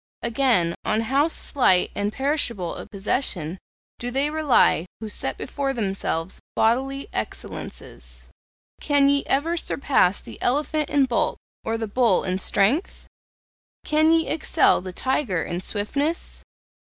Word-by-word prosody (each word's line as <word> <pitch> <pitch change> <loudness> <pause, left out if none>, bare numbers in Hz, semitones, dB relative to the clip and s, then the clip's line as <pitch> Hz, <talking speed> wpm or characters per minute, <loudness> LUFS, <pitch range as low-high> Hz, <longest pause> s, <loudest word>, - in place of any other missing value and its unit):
Again, 235 -8 +2
on 215 +1 +1
how 270 +7 +2
slight 245 - +2
and 205 +1 -2
perishable 245 - 0
a - - -8
possession 195 - -2 0.4
do 245 - -3
they 275 +4 0
rely 295 - +3
who 220 0 -6
set - - -2
before 275 -1 -3
themselves 190 -6 -2 0.2
bodily 270 +5 +1
excellences! - - -7 0.5
Can 285 -2 +3
ye 280 0 +2
ever 315 +5 +1
surpass 265 - +1
the - - -12
elephant 300 +3 0
in 285 -2 +3
bulk 245 -3 0 0.3
or 225 0 -1
the 225 -1 -3
bull 225 -2 +2
in 185 0 -1
strength? 220 - +1 0.8
Can 310 +1 +3
ye 325 -1 +3
excel 310 - +3
the 185 0 -7
tiger 230 - -1
in 175 - -4
swiftness? 280 - -2
250 Hz, 130 wpm, -23 LUFS, 200-285 Hz, 0.8 s, rely